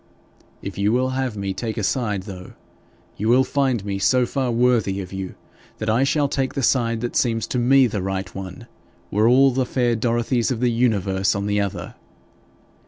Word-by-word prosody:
If 100 -1 -6
you 100 +1 +2
will 130 +2 +1
have 130 -4 -2
me 100 -1 -2
take 110 +3 -4
a 110 - -2
side, 105 -4 -1
though, 95 -2 -9 0.6
you 110 +2 -1
will 125 +2 +5
find 130 -6 0
me 100 -1 -3
so 125 +6 +3
far 130 0 -2
worthy 115 -5 +2
of 95 -1 -7
you 95 -1 -5 0.4
that 110 0 -1
I 120 +4 +3
shall 145 +1 +2
take 135 -1 -2
the 135 - -1
side 115 -3 +1
that 120 - -4
seems 115 -3 +1
to 125 - -1
me 130 +2 +5
the 105 -5 -2
right 95 -1 -4
one, 95 +4 -8 0.5
were 105 +2 +3
all 135 +2 +5
the 130 +1 0
fair 120 -1 0
Dorothies 120 +1 0
of 125 -4 -2
the 125 0 +2
universe 100 -6 +1
on 100 0 -2
the 105 0 +1
other. 100 -1 -4
115 Hz, 195 wpm, -22 LUFS, 100-125 Hz, 0.6 s, will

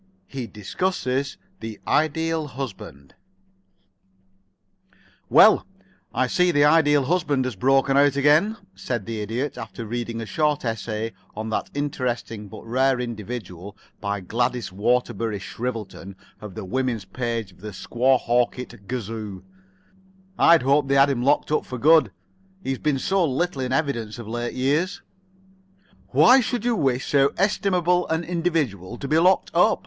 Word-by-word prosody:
II 135 - -3
HE 120 - -5
DISCUSSES 135 - -2 0.2
THE 110 -2 -7
IDEAL 160 0 0
HUSBAND 95 - -8 2.2
"Well, - - +6 0.4
I 130 +2 +1
see 180 +8 +2
the 145 -4 +4
Ideal 145 -2 +4
Husband 145 -3 0
has 130 -4 -3
broken 135 +5 +2
out 140 0 +4
again," 150 +10 +3 0.2
said 100 +2 -4
the 110 0 -4
Idiot, 125 +6 -3
after 115 0 -7
reading 115 +1 -4
a 115 - -4
short 150 +3 0
essay 115 0 -3 0.2
on 110 +1 -5
that - - -2
interesting 125 -7 -3
but 110 +2 -11
rare 130 +2 +2
individual 105 -5 -6 0.2
by 100 -1 -3
Gladys 120 +2 -1
Waterbury 115 +1 0
Shrivelton 105 -2 -6 0.3
of 105 -3 -9
the - - -6
Woman's 120 0 -2
Page 115 -1 -3
of 90 - -22
the 105 - -6
Squehawkett 120 -1 0
Gazoo. 110 -5 -5 0.9
"I'd 165 -7 +5
hoped 140 +2 +3
they 140 - +2
had 140 +1 +5
him 125 -3 -1
locked 140 +3 +2
up 150 - +1
for 125 - -7
good, 150 -1 +5 0.5
he's 135 -1 -2
been 150 -3 0
so 190 +7 +1
little 155 0 -1
in 130 0 -2
evidence 130 -7 -1
of 120 -3 -8
late 120 +1 -4
years." 150 +10 0 1.0
"Why 255 +2 +6
should 240 -1 -2
you 240 -1 +2
wish 135 - 0
so 140 -1 +3
estimable 180 -3 +1
an 160 +1 -1
individual 155 - -2
to 140 - -6
be 155 +3 +3
locked 185 +3 +3
up?" - - +4
130 Hz, 145 wpm, -23 LUFS, 115-150 Hz, 2.2 s, Well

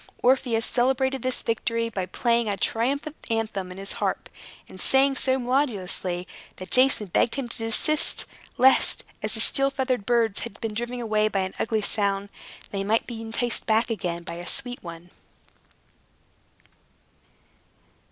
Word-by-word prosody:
Orpheus 245 -3 +2
celebrated 265 +1 +1
this 255 +1 -2
victory 230 0 -1
by 195 -5 -4
playing 235 +3 +1
a 200 - -1
triumphant 280 +9 -1
anthem 220 -5 -2
on 180 - -9
his 195 +1 -6
harp, - - -1 0.4
and 185 - -8
sang 270 +1 +5
so 260 0 +1
melodiously 205 -9 -1 0.3
that 185 - -10
Jason 255 -4 +5
begged 225 - +2
him 275 -3 -3
to 235 - -9
desist, 225 +7 +1 0.3
lest, 265 +2 +4 0.2
as - - -1
the - - 0
steel 275 -1 +4
feathered 260 -6 -2
birds 230 -4 +2
had 230 -3 -6
been 225 -2 -4
driven 240 +3 -4
away 215 -2 +1
by 200 -2 0
an 185 0 -3
ugly 220 -1 0
sound, 200 -1 0 0.4
they 195 -1 -2
might 220 +3 +1
be 230 -2 -7
enticed 225 +1 -1
back 225 +2 +2
again 175 -6 -3
by 170 - -6
a 175 - -8
sweet 245 0 -1
one. 170 0 -10
225 Hz, 150 wpm, -25 LUFS, 200-255 Hz, 0.4 s, sang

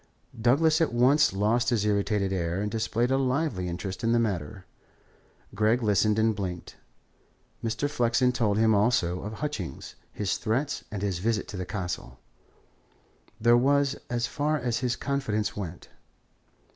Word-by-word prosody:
Douglas 155 +7 +3
at 160 - +2
once 130 +5 +4
lost 110 +5 +1
his 115 -4 +1
irritated 100 -1 +1
air 85 0 -1
and 105 +1 -2
displayed 115 +2 0
a 135 - +2
lively 130 - 0
interest 95 +4 -5
in 115 +1 +2
the 120 - +3
matter; 95 -5 -3 0.9
Gregg 110 +4 +2
listened 105 0 +2
and 110 0 +2
blinked. 90 -4 -5 0.9
Mr. 115 +5 -1
Flexen 125 -1 +2
told 110 -4 0
them 110 0 +4
also 100 -5 +2
of 105 +2 -6
Hutchings, 110 - -5 0.2
his 100 -2 -2
threats, 135 +6 -1
and 100 -2 -5
his 95 -4 -1
visit 110 +2 -1
to - - -6
the 90 -2 -5
Castle. 85 -10 -5 1.2
That 120 +2 +5
was 140 +2 +2
as 120 -1 0
far 150 +4 -1
as 120 -4 -1
his 125 -2 0
confidences 120 -7 -2
went. 90 -4 -7
110 Hz, 150 wpm, -27 LUFS, 100-125 Hz, 1.2 s, That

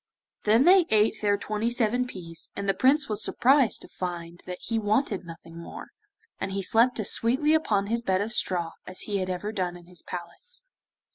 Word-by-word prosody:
Then 220 +4 +5
they 375 +4 +7
each 345 - 0
ate 215 0 +2
their 205 -1 +2
twenty 215 +2 -2
seven 240 +1 +1
peas, 165 -7 -8
and 200 - -4
the 195 - +3
Prince 275 +7 +3
was 215 0 0
surprised 265 -3 +3
to - - -11
find 175 -1 -6
that 180 0 -5
he 225 0 -2
wanted 205 -2 0
nothing 165 0 -11
more, 170 - -9 0.5
and 195 - -3
he 195 0 -2
slept 235 +5 +3
as 210 - +3
sweetly 265 +7 +2
upon 215 -11 +2
his 230 +3 -1
bed 190 -5 +1
of 215 +4 -3
straw 175 -5 +1 0.2
as 185 - -7
he 205 -2 -2
had 185 0 -2
ever 185 +3 -3
done 180 -4 -3
in 175 - -16
his 175 -1 -10
palace. 485 - -6
210 Hz, 205 wpm, -26 LUFS, 180-235 Hz, 0.5 s, they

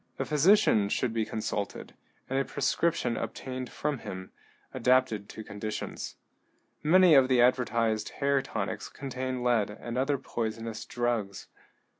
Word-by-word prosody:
A - - -1
physician 150 - +4
should 115 +2 0
be 110 -1 0
consulted, 105 -3 -4 0.3
and 135 +1 0
a - - +2
prescription 165 -5 0
obtained 130 0 -5
from 150 -3 -2
him, 95 -3 -7 0.4
adapted 125 -4 +2
to 110 - -8
conditions. 105 +1 -5 0.7
Many 180 +2 +6
of 135 -3 +7
the 130 -2 +3
advertised 115 -3 +2
hair 140 -1 +2
tonics - - -4
contain 130 -2 -4
lead 120 -4 +2
and 120 +4 -5
other 140 +2 +1
poisonous 115 -3 -4
drugs. 120 -5 -2
120 Hz, 130 wpm, -29 LUFS, 110-135 Hz, 0.7 s, of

